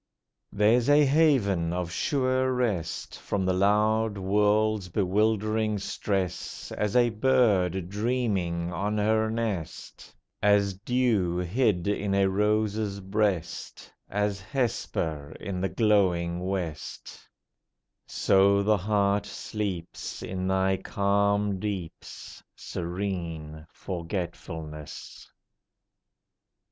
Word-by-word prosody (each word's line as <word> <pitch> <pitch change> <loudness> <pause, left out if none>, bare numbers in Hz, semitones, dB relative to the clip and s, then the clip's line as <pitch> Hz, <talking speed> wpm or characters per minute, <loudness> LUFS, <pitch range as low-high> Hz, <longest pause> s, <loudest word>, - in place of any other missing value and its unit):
There's 115 +5 +3
a 145 0 +6
haven 125 - +3
of 90 -1 -3
sure 130 - +1
rest 105 -10 -2
From 95 -2 -2
the 95 - +2
loud 105 +2 +2
world's 105 0 +2
bewildering 110 +3 +1
stress 95 -2 -3
As 105 +1 -2
a 120 -1 +4
bird 105 -7 +2
dreaming 100 -6 -1
on 105 +3 -1
her 110 +1 +2
nest, 110 -7 -4 0.3
As 100 -1 +3
dew 105 -4 0
hid 90 0 +1
in 100 -1 0
a 100 0 +4
rose's 105 +1 0
breast, 95 -3 -2 0.2
As 105 0 -1
Hesper 80 - -2
in 95 -2 -4
the 95 - 0
glowing 90 -4 +2
West; 90 -5 -5 0.9
So 100 +1 +3
the 105 +1 +3
heart 100 +1 +1
sleeps 95 -6 -5
In 95 0 -3
thy 95 0 +2
calm 100 +1 +1
deeps, 95 -5 -6
Serene 85 -4 -5
Forgetfulness! 85 -4 -6
100 Hz, 95 wpm, -27 LUFS, 90-110 Hz, 0.9 s, a